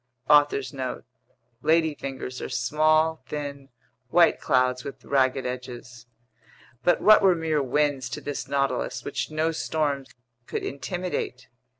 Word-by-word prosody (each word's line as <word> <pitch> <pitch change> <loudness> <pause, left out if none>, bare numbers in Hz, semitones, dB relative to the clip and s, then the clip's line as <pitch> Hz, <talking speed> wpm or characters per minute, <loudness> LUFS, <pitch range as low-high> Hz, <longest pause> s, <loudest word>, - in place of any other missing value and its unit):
* 125 - -44
*Author's 145 -2 -1
Note: 130 -2 -4 0.6
"Ladyfingers" 150 -5 -1
are - - -4
small, 155 +5 +2
thin, 140 -2 -6 0.4
white 170 +5 +4
clouds 125 -2 +2
with 140 - -9
ragged 130 -1 +1
edges. 125 -1 -7 0.8
But 175 - +3
what 215 0 +7
were 190 -3 +5
mere 160 -3 0
winds 135 -1 0
to - - -8
this 145 - -5
Nautilus, 135 - -1
which - - -3
no 155 +1 0
storms 145 -4 -2 0.4
could - - -3
intimidate! 175 +7 -4
140 Hz, 125 wpm, -25 LUFS, 130-155 Hz, 0.8 s, what